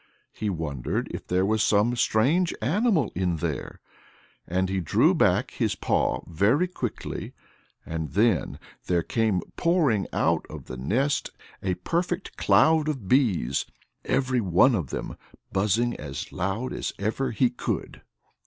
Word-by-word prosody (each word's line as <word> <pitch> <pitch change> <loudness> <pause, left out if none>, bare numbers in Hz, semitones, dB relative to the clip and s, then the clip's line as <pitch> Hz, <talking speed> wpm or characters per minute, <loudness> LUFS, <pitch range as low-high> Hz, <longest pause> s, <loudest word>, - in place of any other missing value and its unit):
He 105 - -3
wondered 75 -8 -3
if - - -7
there 90 +1 +2
was 110 +1 +1
some 110 +3 +3
strange 135 +10 +2
animal 185 - +1
in 90 -1 0
there.... 80 -2 -4 0.7
And 95 +2 0
he 95 0 -1
drew 85 - +3
back - - +2
his - - -1
paw - - 0
very 105 - +2
quickly. 130 -10 -5 0.5
And 80 -2 -4
then 105 - +2 0.3
there 85 -2 +2
came 110 -4 +1 0.2
pouring 155 - +2
out - - +1
of - - -9
the 65 - -7
nest 130 - 0 0.3
a 95 -2 -1
perfect 175 - -2
cloud 160 -1 +4
of 130 -10 -4
bees, 95 - +2 0.4
every 130 -2 +1
one 95 +7 +4
of 85 - -1
them - - -5 0.3
buzzing 105 +5 +1
as 70 -3 -6
loud 100 +7 -2
as - - -3
ever 110 +6 -1
he 120 +2 +2
could. 125 - -4
110 Hz, 140 wpm, -26 LUFS, 90-130 Hz, 0.7 s, cloud